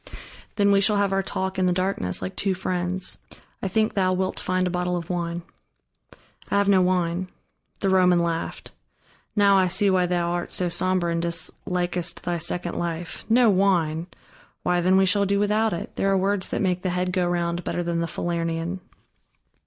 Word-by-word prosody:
"Then 200 -1 +3
we 200 0 +4
shall 210 +1 +3
have 200 -1 +1
our 195 - +2
talk 190 0 -3
in 185 - +3
the - - +3
darkness, 185 - -1
like 185 - -5
two 195 -2 0
friends. 180 0 -2 0.4
I - - -1
think 215 +3 +1
thou 185 -2 +2
wilt 185 0 -1
find 185 0 0
a 180 - -1
bottle 180 0 -1
of 170 +1 -5
wine." 170 -1 -3 1.1
"I - - 0
have 200 0 +2
no 195 -2 +5
wine." 180 0 0 0.5
The 195 - +1
Roman 180 -1 +5
laughed. 170 -1 -2 0.6
"Now 200 -2 +5
I 185 - +3
see 190 +2 +1
why 180 -1 +2
thou 175 -1 0
art 175 0 -3
so 180 -1 0
somber 185 0 +1
and 170 0 0
dislikest 175 +1 -2
thy 175 -1 -1
second 175 +1 -3
life. 170 0 -4
No 235 -1 +5
wine! 175 -4 +1 0.6
Why, 180 0 +1
then 185 +2 +4
we 190 - +5
shall 200 +2 +2
do 200 +1 +1
without 215 +2 +2
it: 170 - -5
there 195 - +1
are 195 - +3
words 195 0 0
that - - -1
make 180 -1 0
the 185 - -1
head 180 0 -1
go 180 -1 +1
round 175 0 -1
better 175 - -2
than 170 -1 -1
the 170 - -1
Falernian." 170 +1 -2
180 Hz, 190 wpm, -24 LUFS, 175-190 Hz, 1.1 s, no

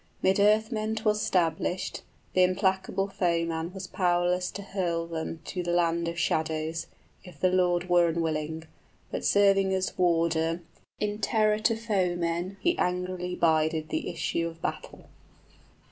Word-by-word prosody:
'Mid 190 +1 +3
earthmen 215 +1 +2
'twas 215 -1 +1
'stablished, 175 0 0 0.3
Th' - - -7
implacable 190 +1 +2
foeman 170 -3 -1
was 190 0 -7
powerless 180 0 +1
to 200 - -7
hurl 175 -4 -2
them 165 -1 -5
To 180 - -3
the 175 - -4
land 170 -1 +1
of 170 0 -4
shadows, 160 0 -1 0.4
if 175 -6 -13
the 185 +2 +3
Lord 180 -1 +2
were 175 -1 +4
unwilling; 160 -1 -2 0.5
But - - -3
serving 195 -1 +4
as 190 0 -2
warder, 165 -1 +1 0.4
in 210 0 -2
terror 215 0 +2
to 225 +1 +2
foemen, 180 -4 -1
He 345 0 +2
angrily 180 0 -1
bided 160 -1 +1
the - - -2
issue 170 0 -1
of 165 0 -9
battle. - - -5
180 Hz, 140 wpm, -28 LUFS, 165-195 Hz, 0.5 s, were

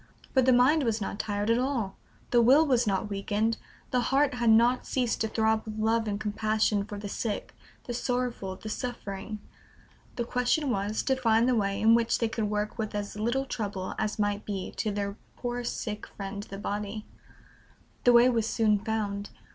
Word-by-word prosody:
But 260 -2 +4
the - - +7
mind 255 +6 +5
was 230 -4 0
not 200 0 -4
tired 205 +1 0
at 230 - +3
all; 250 -7 -1 0.4
the 240 - +5
will 270 +7 +6
was 250 -5 +2
not 195 +1 0
weakened; 210 +2 -1 0.3
the 250 - +2
heart 275 +3 +2
had 240 -2 +1
not 235 +3 +4
ceased 250 -3 0
to 220 - +2
throb 220 0 +1
with 215 -1 -7
love 225 +1 +1
and 205 -1 -2
compassion 215 -1 +1
for 205 - -7
the 205 0 -5
sick, 210 +1 -3 0.3
the 240 - -5
sorrowful, 245 -6 -2
the 215 - -10
suffering; 215 -3 -5 0.8
the 240 - -1
question 250 +4 +1
was 205 0 -1
to 265 - +2
find 230 -2 +3
the 255 - +3
way 200 -3 0
in 225 +1 +5
which 230 0 +3
they 230 - +1
could 220 -2 -2
work 210 +2 -2
with 215 -1 -3
as 205 -1 -4
little 240 +6 0
trouble 200 -7 -4
as 215 -1 -1
might 205 -1 0
be 195 -3 -4
to 215 - 0
their 200 0 -3 0.2
poor 245 0 -3
sick 215 -3 -4
friend 200 0 -6
the 195 - -6
body. 205 +1 -4 1.0
The 245 - +6
way 240 +1 +7
was 230 -3 +1
soon 215 -3 +2
found. 205 -1 -2
220 Hz, 190 wpm, -28 LUFS, 205-240 Hz, 1.0 s, the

